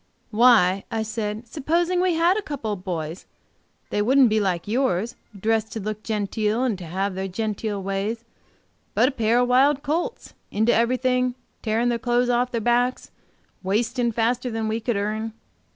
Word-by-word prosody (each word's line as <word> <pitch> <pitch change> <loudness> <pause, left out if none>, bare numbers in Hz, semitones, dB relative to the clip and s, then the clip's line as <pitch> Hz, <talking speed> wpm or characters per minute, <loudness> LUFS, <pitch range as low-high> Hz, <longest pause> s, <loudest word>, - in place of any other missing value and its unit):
"Why, 210 -5 +5
I 220 -1 -1
said, 220 +1 -4
supposing 340 +7 0
we 365 -2 +2
had 340 +3 +3
a 430 - -1
couple, 285 - -4
of 185 -3 -8
boys, 165 -2 -4 0.6
they 205 - +1
wouldn't 260 +3 +5
be 215 0 +2
like 185 -4 -1
yours, 225 -2 0 0.2
dressed 220 +1 0
to 225 - -3
look 215 +1 -4
genteel 215 +2 -1
and 245 -5 +1
to 180 - -7
have 190 +4 -2
their 190 +1 -3
genteel 210 0 -3
ways 200 +4 -2 0.7
but 255 - +4
a - - -4
pair 230 -3 +1
of 245 0 +3
wild 270 +3 +4
colts, 340 - -2 0.2
into 220 +3 +2
everything, 250 +1 +1 0.3
tearing 230 +2 +1
their 235 -1 0
clothes 245 +1 +1
off 245 +1 +1
their 230 - -1
backs, 245 +2 +1
and - - -40 0.5
wasting 235 +4 +1
faster 240 +3 0
than 225 -1 -2
we 220 +1 -1
could 230 -1 -1
earn. 215 +2 -2
225 Hz, 175 wpm, -24 LUFS, 210-250 Hz, 0.7 s, Why